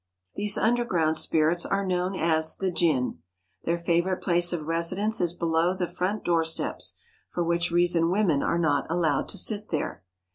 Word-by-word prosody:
These 205 0 -1
underground 215 -9 +1
spirits 160 +2 +1
are 195 0 -1
known 185 +1 -1
as 160 -2 +1
the 190 -1 -2
jinn. 150 - 0 0.5
Their 170 +1 +1
favourite 170 +2 0
place 175 -1 +2
of 165 -4 -3
residence 185 +7 0
is 175 -2 +1
below 170 +1 +1
the 185 -1 -1
front 180 +4 -3
doorsteps, 165 -1 0 0.3
for 175 - -2
which 170 0 0
reason 170 -1 +2
women 180 -7 +2
are 170 - 0
not 150 -4 +1
allowed 165 -4 0
to - - -3
sit 215 -1 -1
there. 155 - -3
170 Hz, 160 wpm, -26 LUFS, 165-185 Hz, 0.5 s, place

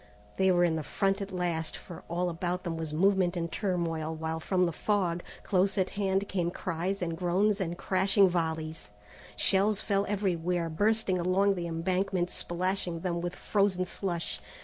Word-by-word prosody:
They 190 0 +4
were 175 -1 +4
in 165 -2 +2
the - - -2
front 195 +6 0
at 200 0 -5
last, 175 -3 -2
for 175 - -10
all 175 +2 0
about 175 +1 -2
them 170 -3 -3
was 160 -2 -4
movement 185 +2 +2
and 170 -1 -2
turmoil, 165 -5 -1
while 160 0 -3
from 180 +2 +1
the 170 - 0
fog, 175 -1 0 0.2
close 195 +1 +2
at 185 -1 +1
hand, 195 0 0
came 175 -3 0
cries 185 +2 -2
and 165 -1 -2
groans 195 +4 +1
and 175 -1 -2
crashing 195 +1 +3
volleys. 160 - -2 0.5
Shells 200 +1 +3
fell 200 0 0
everywhere, 180 -4 0
bursting 205 +2 +1
along 190 +3 +3
the 175 -3 -3
embankment, 180 +2 0
splashing 175 -1 -2
them 170 -1 -1
with 175 0 -3
frozen 195 -3 +1
slush. 175 -2 -3
180 Hz, 170 wpm, -30 LUFS, 170-195 Hz, 0.5 s, They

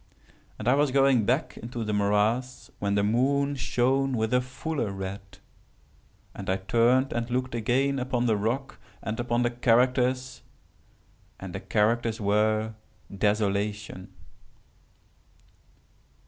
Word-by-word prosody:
And 110 - -6
I 125 - +5
was 145 +1 +3
going 135 -4 +3
back 130 +6 0
into 120 0 -5
the 105 -1 -2
morass, 105 +5 0
when 100 0 0
the 100 - +2
moon 140 +6 +2
shone 130 +1 +1
with 110 +1 -1
a 125 - +4
fuller 130 -2 -3
red, 95 0 -7 1.0
and 100 -2 -7
I 95 - +2
turned 120 +7 +2
and 120 0 -2
looked 130 0 -2
again 130 +4 +1
upon 125 -1 -1
the 115 -3 +3
rock, 115 +7 -2 0.2
and 110 +1 -4
upon 120 0 0
the 120 - +1
characters, 125 +2 +1 1.0
and - - -7
the - - -4
characters 115 +2 0
were 110 +1 +1 0.4
DESOLATION. 105 -1 -1
120 Hz, 125 wpm, -27 LUFS, 105-130 Hz, 1.0 s, I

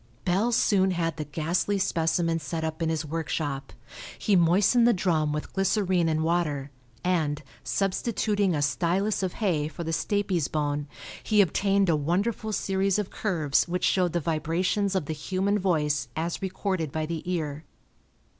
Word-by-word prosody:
Bell 195 +6 +2
soon 195 -4 +3
had 170 -3 -1
the 150 - -3
ghastly 165 +7 -1
specimen 165 -2 +1
set 160 +1 -4
up 160 +1 -3
in 165 - +1
his 160 -1 -1
workshop. 150 -3 -3 0.5
He 205 - +2
moistened 195 +8 +4
the 240 - +5
drum 165 -5 +1
with 150 0 -4
glycerine 190 -3 +1
and 155 0 0
water 155 -5 0 0.3
and, 155 -5 0 0.2
substituting 200 -1 0
a 145 - 0
stylus 180 +8 0
of 185 -2 -2
hay 170 -9 0
for 155 +2 -6
the 165 0 -3
stapes 195 -4 0
bone, 145 -1 -1 0.3
he 215 -1 +1
obtained 195 +1 +3
a 165 - +3
wonderful 195 +9 -1
series 195 -1 +1
of 210 -2 -3
curves 160 -10 +1
which 180 +1 -2
showed 180 -3 +2
the 175 - +1
vibrations 170 +5 0
of 185 - 0
the 155 - -3
human 190 +6 -1
voice 150 -6 +1
as 165 +2 -2
recorded 190 -4 -2
by 155 +1 -2
the 165 0 -4
ear. 155 -3 -3
170 Hz, 160 wpm, -27 LUFS, 155-195 Hz, 0.5 s, the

